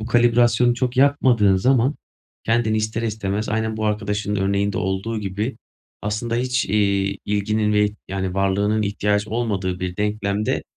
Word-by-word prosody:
bu 110 Hz, -, -5 dB
kalibrasyonu 120 Hz, 0 st, +3 dB
çok 125 Hz, 0 st, -2 dB
yapmadığın 125 Hz, -8 st, +4 dB
zaman 130 Hz, +6 st, +2 dB, 0.5 s
kendini 115 Hz, -1 st, +1 dB
ister 110 Hz, +1 st, -2 dB
istemez, 105 Hz, -1 st, -2 dB
aynen 110 Hz, 0 st, -1 dB
bu 110 Hz, -, -2 dB
arkadaşının 105 Hz, 0 st, -1 dB
örneğinde 100 Hz, +1 st, 0 dB
olduğu 95 Hz, +4 st, -2 dB
gibi, 105 Hz, +5 st, -3 dB, 0.5 s
aslında 110 Hz, +3 st, -2 dB
hiç, 125 Hz, +1 st, 0 dB
iii, 100 Hz, -1 st, +1 dB
ilginin 105 Hz, +1 st, 0 dB
ve 105 Hz, 0 st, +4 dB
ih 105 Hz, -, -6 dB
yani, 95 Hz, -1 st, -3 dB
varlığının 100 Hz, +2 st, +1 dB
ihtiyacı 105 Hz, +1 st, 0 dB
olmadığı 100 Hz, -6 st, -2 dB
bir 90 Hz, -1 st, -4 dB
denklemde, 105 Hz, 0 st, -1 dB
105 Hz, 145 wpm, -22 LUFS, 100-115 Hz, 0.5 s, yapmadığın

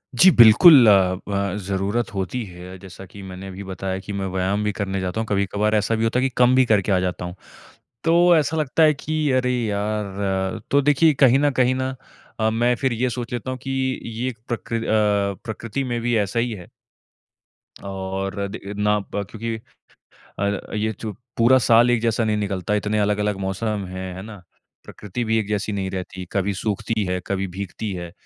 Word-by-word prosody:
जी 185 Hz, +10 st, +7 dB
बिल्कुल, 120 Hz, -, +9 dB
अ, 95 Hz, -3 st, +5 dB
ब 100 Hz, -1 st, -1 dB
ज़रूरत 100 Hz, +4 st, -1 dB
होती 100 Hz, +6 st, -3 dB
है। 90 Hz, 0 st, -10 dB
जैसा 95 Hz, 0 st, -11 dB
कि 100 Hz, -, -10 dB
मैंने 95 Hz, +1 st, -8 dB
अभी 95 Hz, +1 st, -8 dB
बताया 95 Hz, 0 st, -4 dB
कि 100 Hz, -, -4 dB
मैं 100 Hz, 0 st, -3 dB
व्यायाम 95 Hz, +3 st, 0 dB
भी 105 Hz, -, 0 dB
करने 95 Hz, -1 st, -2 dB
जाता 95 Hz, +3 st, -3 dB
हूँ। -, -, -3 dB
कभी-कभार 105 Hz, +2 st, 0 dB
ऐसा 105 Hz, +2 st, +1 dB
भी 110 Hz, -, -1 dB
होता 115 Hz, +2 st, +1 dB
है 130 Hz, -, +1 dB
कि 135 Hz, -, +1 dB
कम 125 Hz, +1 st, +5 dB
भी 130 Hz, -1 st, +5 dB
करके 100 Hz, 0 st, +1 dB
आ 95 Hz, -, +3 dB
जाता 90 Hz, 0 st, -3 dB
हूँ। 90 Hz, +1 st, -7 dB, 0.7 s
तो 165 Hz, +1 st, +3 dB, 0.2 s
ऐसा 160 Hz, +1 st, +1 dB
लगता 155 Hz, +2 st, +2 dB
है 155 Hz, -1 st, +6 dB
कि 155 Hz, +2 st, -4 dB, 0.2 s
अरे 125 Hz, 0 st, 0 dB
यार 105 Hz, -2 st, -1 dB, 0.5 s
अ, -, -, -6 dB
तो 140 Hz, 0 st, +4 dB
देखिए 155 Hz, +2 st, +4 dB
कहीं 130 Hz, +1 st, +6 dB
न 145 Hz, 0 st, +2 dB
कहीं 125 Hz, +1 st, +2 dB
ना 130 Hz, 0 st, -3 dB, 0.4 s
अ, 110 Hz, 0 st, +2 dB
मैं 120 Hz, +2 st, +1 dB
फिर 130 Hz, -2 st, +2 dB
ये 125 Hz, +2 st, 0 dB
सोच 120 Hz, -1 st, -5 dB
लेता 120 Hz, +2 st, -3 dB
हूँ 130 Hz, -, -4 dB
कि 135 Hz, -, -4 dB, 0.3 s
ये 115 Hz, +2 st, -4 dB
एक 115 Hz, -, -9 dB
प्रकृ 115 Hz, -1 st, -3 dB
अ, 105 Hz, -3 st, +1 dB
प्रकृति 115 Hz, +4 st, -4 dB
में 120 Hz, -, -1 dB
भी 120 Hz, 0 st, 0 dB
ऐसा 115 Hz, +5 st, -2 dB
ही 120 Hz, 0 st, 0 dB
है। 90 Hz, -5 st, -8 dB, 1.2 s
और 95 Hz, +1 st, -4 dB
दे 100 Hz, +1 st, -7 dB
ना 105 Hz, 0 st, +2 dB
ब 100 Hz, 0 st, -5 dB
क्योंकि 115 Hz, +1 st, -4 dB, 0.8 s
अ, 100 Hz, +1 st, -2 dB
ये 110 Hz, +1 st, -1 dB
जो 110 Hz, -2 st, -4 dB, 0.3 s
पूरा 120 Hz, +3 st, +5 dB
साल 120 Hz, +1 st, +6 dB
एक 120 Hz, -2 st, +1 dB
जैसा 115 Hz, 0 st, +1 dB
नहीं 105 Hz, -1 st, 0 dB
निकलता। 100 Hz, 0 st, -2 dB
इतने 105 Hz, +1 st, 0 dB
अलग-अलग 105 Hz, 0 st, 0 dB
मौसम 100 Hz, +1 st, -2 dB
हैं, 95 Hz, 0 st, -6 dB
है 95 Hz, -, -7 dB
ना? 105 Hz, -3 st, -10 dB, 0.4 s
प्रकृति 105 Hz, +4 st, -6 dB
भी 110 Hz, 0 st, +1 dB
एक 105 Hz, -, -3 dB
जैसी 105 Hz, 0 st, -2 dB
नहीं 95 Hz, -1 st, -2 dB
रहती। 95 Hz, 0 st, -6 dB
कभी 100 Hz, 0 st, 0 dB
सूखती 105 Hz, +2 st, -2 dB
है, 90 Hz, 0 st, -1 dB
कभी 95 Hz, 0 st, -1 dB
भीगती 100 Hz, +3 st, -5 dB
है। 85 Hz, -1 st, -6 dB
105 Hz, 200 wpm, -22 LUFS, 95-120 Hz, 1.2 s, बिल्कुल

